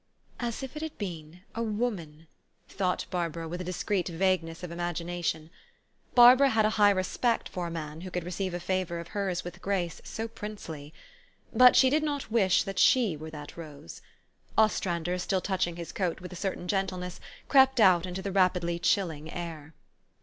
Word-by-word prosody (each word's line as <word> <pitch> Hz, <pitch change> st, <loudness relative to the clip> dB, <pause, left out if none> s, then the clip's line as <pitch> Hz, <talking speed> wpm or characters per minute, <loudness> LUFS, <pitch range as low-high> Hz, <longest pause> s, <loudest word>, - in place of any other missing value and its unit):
"As 240 Hz, +1 st, -3 dB
if 265 Hz, +2 st, -7 dB
it 305 Hz, -, -5 dB
had 315 Hz, -1 st, -5 dB
been 170 Hz, -3 st, -7 dB
a 230 Hz, -, -3 dB
woman,*' 205 Hz, -9 st, -3 dB, 0.4 s
thought 185 Hz, -2 st, -1 dB
Bar 175 Hz, -2 st, 0 dB
bara 165 Hz, +1 st, -6 dB
with 175 Hz, +2 st, -5 dB
a -, -, -3 dB
discreet 185 Hz, +1 st, -1 dB
vagueness 170 Hz, -1 st, 0 dB
of 175 Hz, -, -5 dB
imagination. 170 Hz, -2 st, -3 dB, 0.6 s
Barbara 250 Hz, +3 st, +8 dB
had 220 Hz, -3 st, +3 dB
a 215 Hz, -, +2 dB
high 205 Hz, -, +8 dB
respect 200 Hz, +5 st, 0 dB
for 180 Hz, -2 st, -4 dB
a -, -, -5 dB
man 160 Hz, -1 st, -6 dB
who 185 Hz, -, -6 dB
could 180 Hz, -1 st, -3 dB
receive 180 Hz, +1 st, -3 dB
a -, -, -3 dB
favor 185 Hz, -1 st, -2 dB
of 170 Hz, 0 st, -8 dB
hers 195 Hz, -3 st, -2 dB
with 175 Hz, 0 st, -8 dB
a -, -, -19 dB
grace 185 Hz, -4 st, -2 dB
so 225 Hz, +1 st, -5 dB
princely. 205 Hz, -10 st, -8 dB, 0.6 s
But 250 Hz, 0 st, +7 dB
she 260 Hz, -1 st, +6 dB
did 305 Hz, +2 st, +3 dB
not 290 Hz, -6 st, -3 dB
wish 195 Hz, -5 st, +3 dB, 0.2 s
she 230 Hz, -10 st, +4 dB
were 155 Hz, +1 st, -8 dB
that 150 Hz, -2 st, -9 dB
rose. 150 Hz, -, -10 dB, 0.6 s
Ostrander, 180 Hz, -5 st, +1 dB
still 185 Hz, +1 st, 0 dB
touching 185 Hz, -2 st, -1 dB
his 170 Hz, -1 st, -7 dB
coat 180 Hz, -4 st, -2 dB
with 180 Hz, +1 st, -9 dB
a -, -, -7 dB
certain 185 Hz, -1 st, -3 dB
gentleness, 185 Hz, -2 st, -2 dB, 0.3 s
crept 265 Hz, -2 st, +5 dB
out 185 Hz, -4 st, +5 dB
into 185 Hz, +1 st, -5 dB
the 200 Hz, -, -3 dB
rapidly 180 Hz, -2 st, +2 dB
chilling 170 Hz, -4 st, 0 dB
air. 160 Hz, -3 st, -7 dB
180 Hz, 180 wpm, -29 LUFS, 170-205 Hz, 0.6 s, Barbara